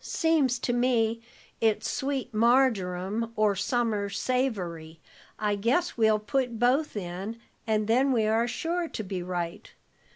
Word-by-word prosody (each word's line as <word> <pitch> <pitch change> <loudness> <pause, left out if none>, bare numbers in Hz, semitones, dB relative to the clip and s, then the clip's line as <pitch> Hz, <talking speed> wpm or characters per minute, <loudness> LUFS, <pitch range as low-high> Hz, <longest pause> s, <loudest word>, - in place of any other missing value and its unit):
"Seems 315 -8 +1
to 240 +1 -1
me 230 -2 +1 0.4
it's 220 -1 +1
sweet 270 -3 -2
marjoram 220 -3 +2
or 210 -2 +2
summer 220 -2 0
savory. 185 -11 -2 0.4
I 210 -1 0
guess 235 - 0
we'll 220 -2 +4
put 235 +3 -1
both 250 +3 +1
in, 190 +4 -5 0.3
and 215 -1 +1
then 260 +5 +3
we 225 -4 +2
are 225 +2 +2
sure 335 +6 -2
to 220 - -5
be 190 -2 -4
right. 175 -1 -4
225 Hz, 135 wpm, -27 LUFS, 205-255 Hz, 0.4 s, we'll